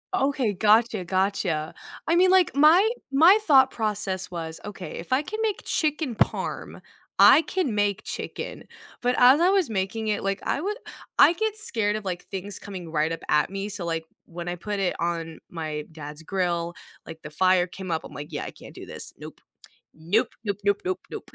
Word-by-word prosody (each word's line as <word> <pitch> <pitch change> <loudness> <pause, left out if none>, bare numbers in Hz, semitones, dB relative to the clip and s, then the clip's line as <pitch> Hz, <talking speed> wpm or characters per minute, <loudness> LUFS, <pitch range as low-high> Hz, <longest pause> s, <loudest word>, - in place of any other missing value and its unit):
Okay, 270 - +1
gotcha, 215 0 +3
gotcha. 185 -4 -1 0.3
I 335 - +3
mean, 370 +1 +5
like, 370 -6 +4
my 325 +8 +6 0.2
my 335 +9 +7
thought 265 -3 +6
process 205 -5 -2
was, 160 -2 -5
okay, 195 -5 -7
if 170 +9 -4
I 270 - +3
can 435 +8 -6
make 425 -3 -1
chicken 300 -6 0
parm, - - -2 0.4
I 320 - +8
can 335 - -1
make 205 -1 0
chicken, - - -5 0.4
but 245 0 +2
as 255 +5 +7
I 360 - +5
was 385 -9 +2
making 215 +2 -2
it, 210 -2 -1
like, 195 0 -1
I 280 - -1
would 415 +4 -2 0.4
I 340 - +8
get 435 +3 -1
scared 225 - 0
of, 215 -2 -5
like, 180 -1 -4
things 195 +1 -6
coming 185 -5 -8
right 155 +1 +1
up 165 - -3
at 150 +5 +2
me, 195 +1 -4
so, 195 -4 -4
like, 165 -1 -2 0.2
when 170 +1 -8
I 175 - -2
put 205 +3 -4
it 185 -2 0
on 165 -1 -3
my 155 -3 -4
dad's 150 0 -9
grill, 175 -2 -1 0.3
like, 160 - -10
the 155 - -8
fire 185 +3 +3
came 185 0 -7
up, 160 - -1
I'm, - - -11
like, 145 +3 -8
"Yeah, 145 - -4
I - - -6
can't - - -14
do - - -10
this. - - -5
Nope, - - -10 0.5
nope, 170 +8 0
nope, 200 -2 -2
nope, 200 0 +2
nope, 370 0 -2
nope." - - -7
200 Hz, 195 wpm, -25 LUFS, 170-265 Hz, 0.5 s, I